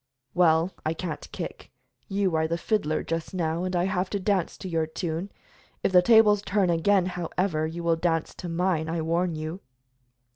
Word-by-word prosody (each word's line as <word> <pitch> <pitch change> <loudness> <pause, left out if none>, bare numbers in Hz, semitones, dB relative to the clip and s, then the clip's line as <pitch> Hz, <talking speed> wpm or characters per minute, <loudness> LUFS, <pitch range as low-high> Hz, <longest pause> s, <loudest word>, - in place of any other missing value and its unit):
"Well, 165 0 +4
I 160 +1 -1
can't 165 -2 -5
kick. - - -7 0.4
You 195 -2 0
are 160 0 +2
the 165 +1 -1
fiddler, 170 -6 0
just 165 +3 -4
now, 165 -1 -1
and 185 0 -2
I 175 - +2
have 185 0 0
got - - -24
to 200 - 0
dance 190 -2 0
to - - -7
your 165 -3 0
tune. 165 +3 -4 0.5
If - - +2
the 180 -1 +7
tables 210 0 +6
turn 200 -3 +1
again, 185 +3 +3
however, 175 -2 -1
you 170 +2 -6
will 165 -1 +2
dance 165 -1 0
to 175 - -6
mine, 165 -2 0
I 165 -1 -1
warn 170 +1 0
you." 155 +4 -5
175 Hz, 190 wpm, -26 LUFS, 160-190 Hz, 0.5 s, the